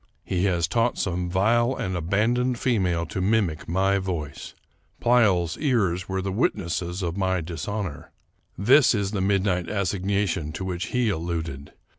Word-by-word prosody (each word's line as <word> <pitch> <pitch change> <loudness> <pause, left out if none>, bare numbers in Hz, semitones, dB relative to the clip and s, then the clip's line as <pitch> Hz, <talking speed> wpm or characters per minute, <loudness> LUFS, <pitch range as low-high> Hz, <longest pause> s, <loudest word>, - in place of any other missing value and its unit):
He 90 0 -1
has 85 -4 +1
taught 115 +7 +1
some 90 -1 -1
vile 120 +7 +2
and 95 0 -3
aban 100 +8 +1
doned 125 0 0
female 95 -9 +1
to 95 - -4
mimic 95 -6 0
my 95 +3 +2
voice. 85 -7 -5 0.4
Pleyel's 100 -9 +3
ears 100 - 0
were 95 0 -2
the 95 - -2
witnesses 90 -3 -1
of 85 +1 -2
my 95 -2 +1
dishonor. 85 +1 -5 0.5
This 125 +6 +5
is 100 -2 -1
the 100 -3 -2
midnight 95 -3 +1
assignation 100 -4 -1
to 95 - -5
which 90 -1 -3
he 125 -2 +1
alluded. 80 -5 -4
95 Hz, 150 wpm, -25 LUFS, 85-105 Hz, 0.5 s, This